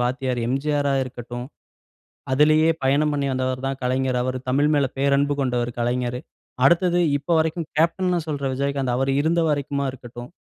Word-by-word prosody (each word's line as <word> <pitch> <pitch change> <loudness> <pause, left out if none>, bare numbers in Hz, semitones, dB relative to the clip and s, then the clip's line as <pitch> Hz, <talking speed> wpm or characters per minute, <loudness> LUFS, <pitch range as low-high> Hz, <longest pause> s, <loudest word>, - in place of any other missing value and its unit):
வாத்தியார் 125 0 -1
எம்ஜிஆரா 140 +2 0
இருக்கட்டும். 120 -1 -7 0.9
அதிலேயே 155 +3 +4
பயணம் 145 +3 +2
பண்ணி 140 -1 -1
வந்தவர் 130 0 -2
தான் 135 0 -3
கலைஞர். 130 0 0
அவர் 130 +1 -2
தமிழ் 140 +3 +2
மேல 140 -2 +3
பேரன்பு 140 +1 +2
கொண்டவர் 125 -2 0
கலைஞர். 120 +1 -1 0.5
அடுத்தது 175 +2 +3 0.2
இப்போ 145 +5 -3
வரைக்கும் 160 0 -1
கேப்டன்னு 175 +2 +1
சொல்ற 145 -3 -3
விஜயகாந்த், 135 -2 -1
அவர் 135 +1 0
இருந்த 165 +3 +2
வரைக்குமா 140 -1 -1
இருக்கட்டும். 120 -1 -10
135 Hz, 145 wpm, -23 LUFS, 130-150 Hz, 0.9 s, அதிலேயே